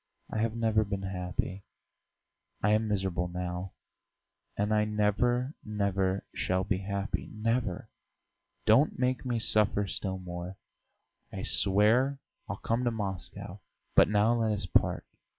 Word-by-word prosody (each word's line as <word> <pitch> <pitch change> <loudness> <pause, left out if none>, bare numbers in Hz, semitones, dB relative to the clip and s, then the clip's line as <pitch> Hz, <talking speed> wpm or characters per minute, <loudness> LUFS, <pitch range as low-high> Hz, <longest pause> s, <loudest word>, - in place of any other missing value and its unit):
I 110 - -2
have 115 0 0
never 110 -2 +2
been 100 -2 -4
happy; 95 +1 -3 1.0
I 105 - +4
am 110 +1 +3
miserable 95 -4 0
now, 90 +1 -4 0.8
and 105 +1 +1
I 105 0 +4
never, 110 +5 +1
never 100 -2 0
shall 95 +1 0
be 95 0 0
happy, 100 0 -3
never! 115 -3 -1 0.8
Don't 115 +8 +5
make 125 -1 0
me 120 -2 0
suffer 105 -2 +3
still 95 -1 -2
more! 90 +1 -6 0.7
I - - -5
swear 110 +8 +3 0.3
I'll - - -2
come 115 +2 -1
to - - +4
Moscow. 100 -5 -5 0.3
But - - +6
now 105 +2 +4
let 115 -2 +1
us 105 - -3
part. - - +1
105 Hz, 135 wpm, -30 LUFS, 95-110 Hz, 1.0 s, But